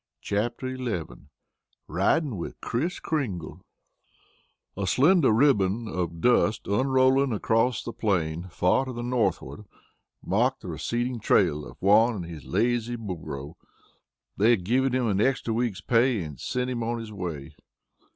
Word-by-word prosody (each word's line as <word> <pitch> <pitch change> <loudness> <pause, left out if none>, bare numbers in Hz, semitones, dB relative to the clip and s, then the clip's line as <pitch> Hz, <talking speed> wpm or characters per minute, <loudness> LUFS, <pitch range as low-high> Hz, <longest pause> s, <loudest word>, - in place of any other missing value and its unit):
CHAPTER 120 +5 -2
XI 115 -10 -2 0.8
RIDING 115 - +1
WITH 85 - -6
KRIS 165 +11 -2
KRINGLE 115 - -3 1.1
A 95 -1 -3
slender 150 - +4
ribbon 110 -3 +2
of 85 -4 -3
dust 120 -3 +2
unrolling 130 +4 +3
across 115 +3 +1
the 115 - -6
plain 90 -7 -1
far 90 +9 +2
to 130 - -6
the 120 0 -5
northward 110 - -1 0.6
marked 120 +8 +1
the 90 - -8
receding 120 +10 -2
trail 75 -7 +2
of - - -13
Juan 110 +4 +4
and 90 -4 -5
his 80 -5 -9
lazy 120 +4 0
burro. 80 - -7 0.8
They 105 +4 +4
had 115 -7 +3
given 130 +7 +1
him 130 0 +1
a 105 - +1 0.4
week's 115 -4 -1
extra - - -43
pay 115 -4 +3
and 75 -4 -9
sent 125 0 -2
him 120 -2 -3
on 120 +1 -1
his 115 -2 -7
way. 80 -6 -6
115 Hz, 140 wpm, -26 LUFS, 90-125 Hz, 1.1 s, slender